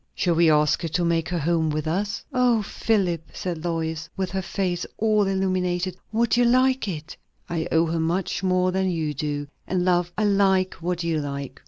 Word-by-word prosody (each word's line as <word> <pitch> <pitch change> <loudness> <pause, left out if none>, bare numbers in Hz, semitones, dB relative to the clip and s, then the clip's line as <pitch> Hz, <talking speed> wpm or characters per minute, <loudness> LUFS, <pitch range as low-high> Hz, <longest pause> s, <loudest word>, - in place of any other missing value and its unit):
"Shall 175 - +1
we 165 0 +4
ask 150 +1 +3
her 170 - -2
to 170 +2 0
make 165 -2 +1
her 175 - -1
home 165 0 +1
with 155 0 -2
us?" 200 +6 -2
"O 245 -4 +3
Philip!" 195 -6 0
said 170 -3 -4
Lois, 160 -2 -2
with 190 -2 -2
her 190 0 -1
face 180 -1 -2
all 215 -2 +2
illuminated, 185 -2 0 0.2
"would 230 +1 +2
you 245 - +4
like 255 0 +3
it?" 160 -3 -5 0.3
"I 165 -1 -2
owe 165 +1 +4
her 165 0 -1
much 175 +2 -1
more 185 -1 +2
than 190 0 0
you 160 -4 -1
do. 145 0 -3 0.2
And, 180 -1 0
love, 175 -1 +2
I 215 - +1
like 195 -2 +3
what 175 0 -2
you 165 -2 0
like." 140 -2 -5
175 Hz, 195 wpm, -24 LUFS, 160-190 Hz, 0.3 s, we